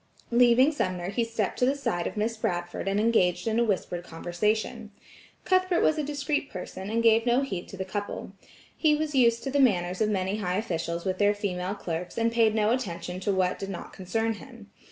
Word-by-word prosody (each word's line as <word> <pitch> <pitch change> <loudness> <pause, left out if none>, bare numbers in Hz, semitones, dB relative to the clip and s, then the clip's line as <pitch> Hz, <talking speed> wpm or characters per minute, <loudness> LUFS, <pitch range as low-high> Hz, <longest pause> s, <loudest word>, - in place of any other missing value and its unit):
Leaving 245 +4 +5
Sumner 185 - -2
he 230 +3 0
stepped 225 -3 -2
to 250 - +4
the 275 - +2
side 175 -11 -1
of - - -6
Miss 220 +2 0
Bradford 175 -3 -3
and 195 +1 +1
engaged 215 -3 +2
in 225 +1 +1
a - - +4
whispered 185 -5 -1
conversation. 210 +7 -2 0.6
Cuthbert 370 -1 +2
was 315 - +3
a - - 0
discreet 290 0 -2
person 190 +1 -7
and 230 +1 0
gave 225 +1 +4
no 240 +2 +4
heed 195 -10 -4
to 195 - -10
the 190 - -3
couple. 205 0 -5 0.4
He 305 -2 +3
was 305 0 -2
used 235 -3 +3
to 270 - -3
the 285 - +1
manners 185 -8 +2
of 215 - +3
many 195 0 0
high 180 -3 -1
officials 170 -4 -3
with 185 -1 -1
their 205 0 +4
female 190 -1 -3
clerks, 175 -2 -5
and 230 0 +2
paid 225 -2 +3
no 215 0 +2
attention 185 -7 -3
to 195 +2 0
what 185 -1 +1
did 195 - -5
not 185 - -7
concern 225 +5 -1
him. 220 -1 -13
210 Hz, 210 wpm, -27 LUFS, 185-235 Hz, 0.6 s, Leaving